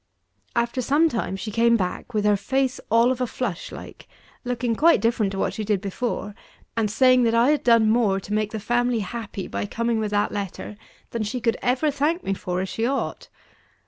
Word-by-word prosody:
After 235 +2 0
some 295 +6 +3
time, 225 -7 -2
she 205 +3 -5
came 235 +2 +4
back 185 +4 -3
with 210 -1 +1
her 210 0 +4
face 260 +6 -1
all 230 +3 +4
of 260 0 -3
a 250 - +1
flush, 225 -8 -4
like; - - -10 0.4
looking 245 -2 -1
quite 330 +7 +5
different 225 -3 +1
to - - -4
what - - 0
she 215 - -4
did 210 -2 +1
before, 205 +1 -3 0.4
and 225 -2 +1
saying 255 +3 +4
that 230 0 +2
I 240 +5 +4
had 300 - 0
done 230 -2 +5
more 215 -4 +2
to 200 +2 -6
make 215 0 0
the 220 - -4
family 240 +2 +1
happy 205 -1 -5
by - - -3
coming 230 +1 -1
with 215 -1 -1
that 205 0 +1
letter, 205 0 -5 0.4
than 230 - -3
she 215 +4 -2
could 230 -1 +1
ever 260 +5 +1
thank 300 +5 0
me 195 - -1
for 180 -1 -3
as 190 - -3
she 225 - -3
ought. 270 +3 -2
230 Hz, 210 wpm, -24 LUFS, 205-250 Hz, 0.4 s, quite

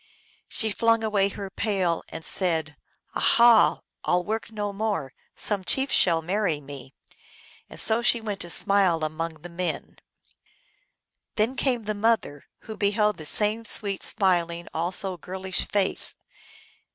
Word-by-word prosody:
She 220 -1 -2
flung 230 +1 +2
away 205 -2 +1
her 200 -1 -7
pail, 190 -6 -1
and 160 -1 -8
said, 160 -5 -1 0.4
"Aha! 235 -2 +5 0.2
I - - -1
11 175 0 +1
work 220 +1 -3
no 205 -2 -4
more; 200 -10 -3 0.2
some 205 -3 -1
chief 265 +8 0
shall 165 -2 +3
marry 180 -3 -1
me! 140 -1 -11 0.4
" - - -25
and - - -10
so 220 +1 +4
she 240 0 +3
went 210 -3 -5
to 175 - -7
smile 185 -3 +2
among 155 0 -4
the - - -7
men. 175 +1 -5 1.4
Then 225 +4 0
came 250 -4 0
the 215 0 -2
mother, 205 -9 -1 0.2
who 220 - -8
beheld 210 0 +1
the 155 - -7
same 215 +5 +3
sweet, 200 -3 +3
smiling, 170 -3 +1
also 180 +3 -2
girlish 185 +2 -4
face. 200 -2 +2
195 Hz, 145 wpm, -25 LUFS, 170-215 Hz, 1.4 s, Aha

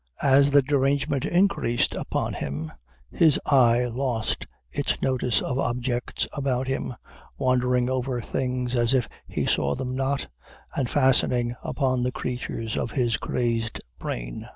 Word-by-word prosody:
As 140 +1 +6
the 140 -1 +5
derangement 140 0 +1
increased 175 -10 +2
upon - - -2
him, 75 +3 -4 0.4
his 160 -4 +4
eye 125 -3 +4
lost 120 -2 -2 0.2
its - - -1
notice 125 -3 +1
of 130 +1 -2
objects 125 -1 -1
about 135 -2 -1
him, 135 -1 -2 0.4
wandering 125 -1 +2
over 130 -1 -1
things 125 +1 -2
as 120 +2 +3
if 125 - +1 0.2
he - - -2
saw 70 0 +1
them 130 -1 -4
not, 135 +1 0 0.5
and 130 -4 0
fastening 125 -3 +3
upon 130 -3 0
the 125 +1 0
creatures 120 -3 -4
of - - -1
his 120 -4 +1
crazed 115 -2 -1 0.2
brain. - - -5
125 Hz, 135 wpm, -25 LUFS, 120-135 Hz, 0.5 s, As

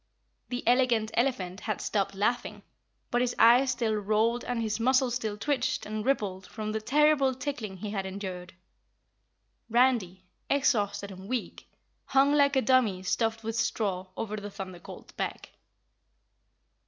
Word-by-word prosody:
The 245 0 -3
Elegant 240 -3 +3
Elephant 200 -7 0
had 215 -2 -3
stopped 200 -1 -1
laughing, 225 +5 -1 0.5
but 245 - +2
his 245 -1 0
eyes 245 +4 +6
still 235 -3 0
rolled 215 +3 +1
and 245 -1 -2
his 220 -1 -1
muscles 255 +1 +3
still 220 -4 -3
twitched 265 +2 -1
and 215 0 -4
rippled 200 -8 -1
from 215 -1 -5
the 220 0 -2
terrible 275 +1 +3
tickling 250 -7 -5
he 205 +2 -5
had 195 -2 -3
endured. 185 -2 -6 1.1
Randy, 225 -7 +2 0.2
exhausted 205 -7 +1
and 190 +2 -10
weak, 255 -2 -4 0.4
hung 275 +1 +3
like 285 -1 +4
a 265 - +3
dummy 230 -8 +2
stuffed 225 +3 0
with 225 0 -3
straw 200 -5 -1
over 215 -1 -3
the 205 0 -6
Thunder 190 -3 -8
Colt's - - -12
back. - - -5
225 Hz, 145 wpm, -28 LUFS, 200-255 Hz, 1.1 s, eyes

